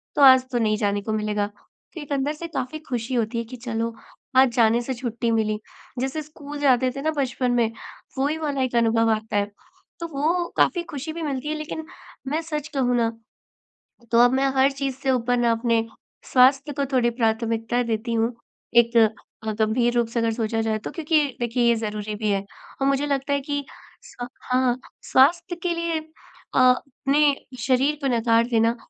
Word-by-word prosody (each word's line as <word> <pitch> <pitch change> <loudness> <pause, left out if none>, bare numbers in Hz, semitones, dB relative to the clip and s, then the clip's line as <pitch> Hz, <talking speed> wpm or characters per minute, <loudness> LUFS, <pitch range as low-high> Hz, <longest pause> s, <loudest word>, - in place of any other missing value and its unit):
तो - - +1
आज 260 -1 +8
तो 245 - 0
नहीं 215 -1 +1
जाने 205 -1 0
को 215 +2 -3
मिलेगा। 210 -1 0
तो 210 - -15
एक 290 - -10
अंदर 280 +2 0
से 335 +2 -7
काफ़ी 310 -2 -4
ख़ुशी 245 0 -3
होती 230 -1 0
है 230 - -1
कि 235 +3 -10
चलो 230 -1 -3 0.4
आज 260 -1 +7
जाने 230 0 +4
से 260 +2 -3
छुट्टी 235 -1 -2
मिली। 215 -1 0 0.4
जैसे 270 +4 -2
स्कूल 295 -1 -9
जाते 260 -3 +3
थे 275 - -4
ना 315 +2 +1
बचपन 255 -2 0
में 235 -2 +2 0.5
वही 285 +4 0
वाला 290 -4 -2
एक 255 -2 -1
अनुभव 225 -1 +3
आता 215 -1 -1
है। 205 0 0 0.5
तो 335 - -4
वो 330 +4 0
काफ़ी 350 -2 +3
ख़ुशी 305 +1 -5
भी 335 - -6
मिलती 280 -1 -3
है 310 - -1
लेक़िन 310 +1 -5 0.4
मैं 305 +4 0
सच 300 -3 -4
कहूँ 250 -3 +1
ना 230 -1 +2 1.0
तो 230 - +5
अब 245 - +3
मैं 270 +1 +2
हर 265 +1 +4
चीज़ 275 -1 -3
से 270 0 -1
ऊपर 245 -1 +1
ना 235 -1 +3
अपने 230 0 +1 0.5
स्वास्थ्य 270 +3 +5
को 280 - +2
थोड़ी 240 -2 +3
प्राथमिकता 230 0 0
देती 230 0 -2
हूँ। 230 +1 +1 0.5
एक 235 0 +5 0.5
अ, 220 - -2
गंभीर 225 +3 +1
रूप 235 -1 +2
से 235 +1 -2
अगर 230 -1 +1
सोचा 225 -1 -1
जाए 220 -1 0
तो - - -4
क्योंकि 320 -1 +1 0.2
देखिए 240 0 0
ये 235 - +4
ज़रूरी 210 0 -4
भी 215 0 -2
है 195 0 0 0.4
और 270 - +3
मुझे 275 +1 +1
लगता 280 0 -1
है 280 - +2
कि 285 +1 -3 0.4
स 245 - -8 0.2
हाँ 255 -1 +2 0.4
स्वास्थ्य 340 +6 +4
के 355 - 0
लिए 335 -1 -1
अ, 315 -3 -7
अपने 275 +3 +3 0.2
शरीर 265 +4 +2
को 275 - 0
नकार 230 0 +3
देना 230 -1 +2
250 Hz, 195 wpm, -24 LUFS, 230-280 Hz, 1.0 s, आज